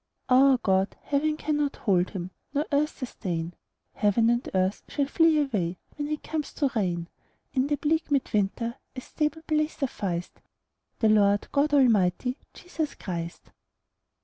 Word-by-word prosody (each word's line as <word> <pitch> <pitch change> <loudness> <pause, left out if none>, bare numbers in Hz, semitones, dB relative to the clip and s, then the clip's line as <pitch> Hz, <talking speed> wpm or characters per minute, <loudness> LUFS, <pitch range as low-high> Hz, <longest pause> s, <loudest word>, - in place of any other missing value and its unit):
Our 265 +1 +6
God, 190 -4 +1
heaven 300 +2 0
cannot 295 -2 -1
hold 185 -3 +1
Him, 185 -2 -6 0.2
Nor 290 +2 +1
earth 295 +2 +1
sustain; 175 -9 -4 0.4
Heaven 225 +2 +3
and 240 +1 -1
earth 185 +1 +1
shall 285 - 0
flee 325 +2 +4
away 205 - 0 0.2
When 290 0 -3
He 305 0 -1
comes 305 0 -4
to 280 -3 0
reign: 175 -5 -1 0.5
In 265 0 +2
the 290 - +1
bleak 315 +3 0
mid 280 -2 0
winter 225 +4 0 0.2
A 255 - -5
stable 310 +4 -2
place 305 -1 0
sufficed 190 - -3 0.6
The 220 - +3
Lord 205 -1 +4
God 290 +1 +2
Almighty, 245 0 +3
Jesus 320 -4 -5
Christ. 170 -2 -6
255 Hz, 150 wpm, -27 LUFS, 195-295 Hz, 0.6 s, Our